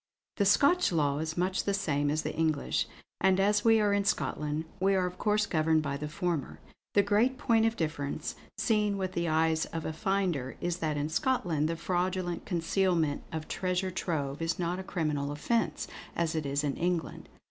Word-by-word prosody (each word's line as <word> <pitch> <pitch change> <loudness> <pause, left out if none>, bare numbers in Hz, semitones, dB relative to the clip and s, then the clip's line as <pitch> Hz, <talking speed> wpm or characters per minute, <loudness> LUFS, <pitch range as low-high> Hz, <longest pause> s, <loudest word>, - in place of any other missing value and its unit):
"The 200 - +2
Scotch 280 - +4
law 145 -4 +1
is 160 +1 -3
much 185 +2 0
the 200 - +1
same 145 -7 0
as 155 +2 0
the - - -3
English; 155 -2 0 0.3
and 190 0 +3
as 205 +1 +3
we 225 -1 +5
are 205 -1 +3
in 200 0 +2
Scotland, 150 -5 -1
we 195 +1 +3
are 185 -1 +2
of 180 0 -5
course 210 0 +2
governed 155 -1 +2
by 140 -1 -2
the 150 +2 -4
former. 160 - -2 0.4
The 200 - +6
great 215 +6 +2
point 225 -3 +3
of 225 - -1
difference, 155 -5 -3 0.2
seen 210 -3 +1
with 190 -1 -2
the 170 -1 -1
eyes 160 0 +2
of 165 -1 -5
a 160 - -2
finder, 180 - -1
is 175 0 -1
that 155 -4 -1
in 145 +1 -1
Scotland 165 - +1
the 165 - -1
fraudulent 180 +1 -2
concealment 170 -3 +1
of 160 -1 -4
Treasure 185 0 -1
Trove 150 -5 -2
is 165 +1 0
not 175 +1 -1
a - - -5
criminal 150 -6 -1
offence, 230 +11 -1 0.3
as 170 -1 0
it 155 -3 -2
is 140 +1 0
in 140 -2 -1
England. 175 -1 -2
170 Hz, 190 wpm, -30 LUFS, 155-195 Hz, 0.4 s, The